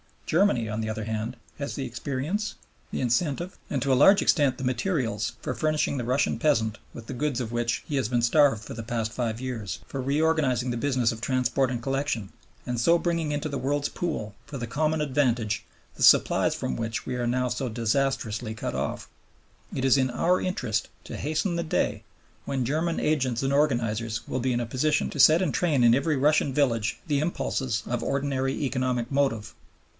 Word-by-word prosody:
Germany, 160 - +2
on 110 +1 -3
the 110 - -3
other 110 0 -3
hand, 110 +3 -3 0.2
has 140 - -4
the 135 - -3
experience, 140 - -3 0.3
the - - -3
incentive, 145 +8 0
and 140 - -1
to 135 - +1
a - - +6
large 195 +10 +6
extent 145 -5 +3
the - - -6
materials 125 - -1
for - - -2
furnishing 155 -2 0
the 120 - -3
Russian 130 +4 +1
peasant 115 -7 +2 0.2
with 115 - -9
the - - -5
goods 135 -1 -1
of 115 -2 -4
which 120 0 -1
he 145 - -2
has 130 - +1
been 120 0 +1
starved 120 -2 +4
for - - -8
the 115 - -5
past 115 -1 -2
five 115 -1 -2
years, 115 -9 -4
for 135 - -5
reorganizing 140 -3 +1
the 120 - -2
business 125 -2 +1
of 115 - -6
transport 130 +1 +1
and 120 -2 -4
collection, 135 -6 -1 0.4
and 125 -1 -2
so 170 +9 +5
for - - -7
bringing 170 -3 0
into 145 +1 -2
the 140 - -3
world's 145 +2 -1
pool, 150 -12 -3
for 140 - -6
the 120 - -3
common 155 +6 0
advantage, 125 -7 0 0.3
the - - -11
supplies - - +5
from 65 - -3
which 115 0 -3
we 130 - -3
are 120 -1 -1
now 125 +1 +1
so 125 +2 -2
disastrously 115 -1 -1
cut - - -4
off. - - -3 0.7
It 130 - -2
is 135 +1 +5
in 130 -1 +2
our 175 +9 +2
interest 125 - -1 0.2
to - - -7
hasten 155 +4 -1
the 170 - -1
day 160 - -1 0.4
when 130 -3 -1
German 160 +6 0
agents 130 -5 +1
and 135 +1 +1
organizers 115 -6 0
will 130 - -2
be 130 +1 0
in 120 - 0
a - - -2
position 140 +6 +1
to 145 - -6
set 155 +5 +7
in 180 -6 +1
train 150 -7 +2
in 115 -1 +6
every 140 +5 +2
Russian 145 0 +2
village 120 -6 +1
the 145 -3 +1
impulses 130 -7 -1
of 120 -1 -2
ordinary 135 -1 -1
economic 130 -2 -1
motive. 135 -6 0
130 Hz, 200 wpm, -26 LUFS, 115-145 Hz, 0.7 s, set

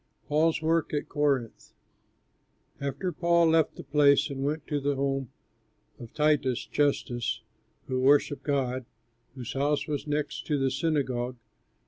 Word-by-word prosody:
PAUL'S 160 +2 +2
WORK 165 -1 +1
AT 145 - -2
CORINTH 140 -6 -1 1.1
And 150 +5 -3
Paul 170 -1 +4
left 160 -1 +3
the - - -9
place 140 +1 +4
and 135 -1 -4
went 150 +2 -2
to 145 -2 -1
the 140 0 0
home 135 -2 -1 0.7
of 120 -2 -10
Titius 150 -5 +2
Justus, 135 -4 0 0.4
who 130 -1 -2
worshipped 140 +2 +3
God, 130 -3 -1 0.5
whose 125 -4 -6
house 145 +2 0
was 150 -1 -3
next 150 0 -2
to 150 - +1
the 135 -1 +1
synagogue. 130 -4 -1
145 Hz, 135 wpm, -28 LUFS, 135-150 Hz, 1.1 s, Paul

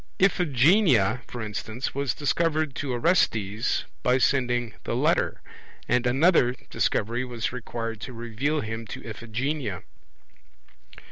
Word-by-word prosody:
Iphigenia, 155 - +4
for 120 -2 -6
instance, 110 +4 -4
was 140 -4 -1
discovered 155 0 0
to 140 -2 -2
Orestes 115 - +1 0.2
by 125 +1 +3
sending 120 -4 +1
the - - -2
letter; - - +1 0.4
and 125 0 +2
another 130 -1 +4 0.2
Discovery 120 +4 0
was 120 -2 -3
required 115 -3 -5
to 125 - -6
reveal 120 +6 -2
him 110 +1 -5
to - - -8
Iphigenia. 115 - -3
125 Hz, 115 wpm, -26 LUFS, 115-140 Hz, 0.4 s, Iphigenia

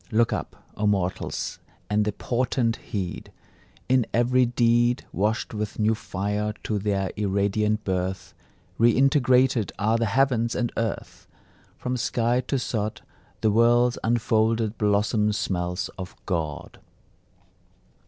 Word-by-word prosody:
Look 115 +1 +3
up, - - -4 0.2
O 105 +1 0
mortals, 95 -3 -1 0.3
and 105 +1 +1
the 105 - 0
portent 120 +1 0
heed; 95 -4 -5 0.6
In 130 -2 +3
every 125 +1 +3
deed, 120 +1 +2
Washed 105 +4 -1
with 105 -1 -4
new 110 +1 +2
fire 105 0 -3
to 105 -2 -1
their 100 -2 -1
irradiant 105 +1 0
birth, 95 -1 -3 0.5
Reintegrated 125 -1 +3
are 110 +3 +2
the 115 - +1
heavens 120 0 +1
and 120 -2 -1
earth! 115 -3 -4 0.5
From 125 0 -2
sky 120 +1 +1
to 140 - 0
sod, 110 -4 -3 0.4
The 110 - +3
world's 120 +2 +4
unfolded 115 -1 +1
blossom 105 +1 +2
smells 90 -3 -2
of 95 0 -7
God. 80 -5 -3
110 Hz, 120 wpm, -25 LUFS, 105-120 Hz, 0.6 s, world's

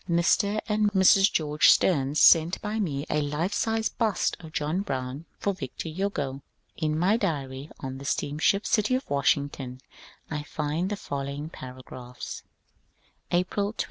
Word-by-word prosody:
Mr. 200 +5 +2
and 210 -1 +2
Mrs. 195 +1 +6
George 150 -1 +3
Steams 145 -4 +3
sent 165 +2 +6
by 215 +1 -3
me 145 -8 -2
a 150 - 0
life 150 +7 -1
sized 225 +1 0
bust 220 -6 +1
of 160 -2 -11
John 155 +5 -1
Brown 135 -3 -4
for 200 - -1
Victor 155 -1 -6
Hugo. 155 -6 -3 0.3
In 155 -1 -1
my 190 +7 +3
diary 140 - -3
on 135 0 -5
the 140 - -9
steamship 155 +10 +1
City 215 +4 +2
of 260 - -3
Washington 140 -2 0 0.5
I 150 -1 -3
find 155 +4 -2
the 205 - -1
following 140 -1 -5
paragraphs: 125 -3 -9 0.5
— - - -40
April 200 +4 0
21. - - -34
155 Hz, 150 wpm, -27 LUFS, 140-195 Hz, 0.5 s, Mrs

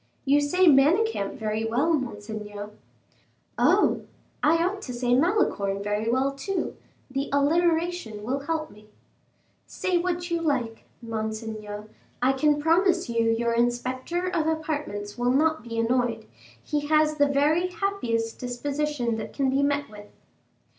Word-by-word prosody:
"You 285 +1 +4
say 360 +6 +3
Manicamp 310 - +4
very 215 0 -2
well, 250 +9 +1
monseigneur." 210 -5 -4 0.9
"Oh, - - +4 0.4
I 305 +2 +4
ought 395 +2 -2
to 255 - -6
say 245 0 0
Malicorne 245 - +1
very 210 +2 -1
well, 260 +3 +2
too. 360 +8 -3 0.4
The 275 +1 -2
alliteration 320 -5 +1
will 260 +5 -1
help 310 +2 -3
me." 210 +1 -17 0.8
"Say 365 -2 0
what 350 0 -2
you 335 -1 0
like, 250 -8 -1 0.2
monseigneur, 220 -2 -5 0.3
I 255 +2 +3
can 295 +2 +2
promise 350 +1 +2
you 230 -1 +1
your 235 +1 +1
inspector 255 +8 -1
of 325 -4 0
apartments 295 -10 -3
will 245 0 +2
not 315 +3 +2
be 230 -1 -6
annoyed; 230 -1 0 0.4
he 295 -1 -2
has 305 0 +3
the 285 -1 +4
very 295 +5 +2
happiest 300 - -2
disposition 255 -1 -2
that 220 - -6
can 270 -2 +1
be 270 +1 +2
met 285 0 +1
with." 210 -1 -12
275 Hz, 140 wpm, -26 LUFS, 225-315 Hz, 0.9 s, You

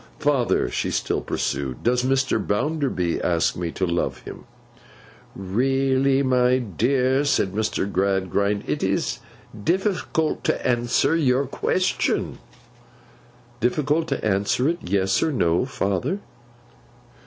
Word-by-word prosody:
'Father,' 140 -5 +1
she - - -1
still - - -1
pursued, 65 -3 -3
'does 125 +1 +2
Mr. 130 +1 +1
Bounderby 115 - -1
ask 85 -2 +1
me 85 -1 -3
to 95 - -1
love 85 0 -2
him?' - - -10 0.9
'Really, 135 +6 +1
my 125 -1 +3
dear,' 130 - +1
said 130 -9 +1
Mr. 105 -2 -1
Gradgrind, 100 +1 0
'it - - -2
is - - -1 0.4
difficult 180 - 0
to - - 0
answer 120 +5 +2
your 140 -4 +2
question—' 185 +7 -1 1.2
'Difficult 150 +6 +1
to 135 -6 -3
answer 110 +6 +1
it, 170 +2 0
Yes 95 0 +1
or 160 - +1
No, 85 - +1
father? 100 - -1
125 Hz, 115 wpm, -23 LUFS, 100-140 Hz, 1.2 s, my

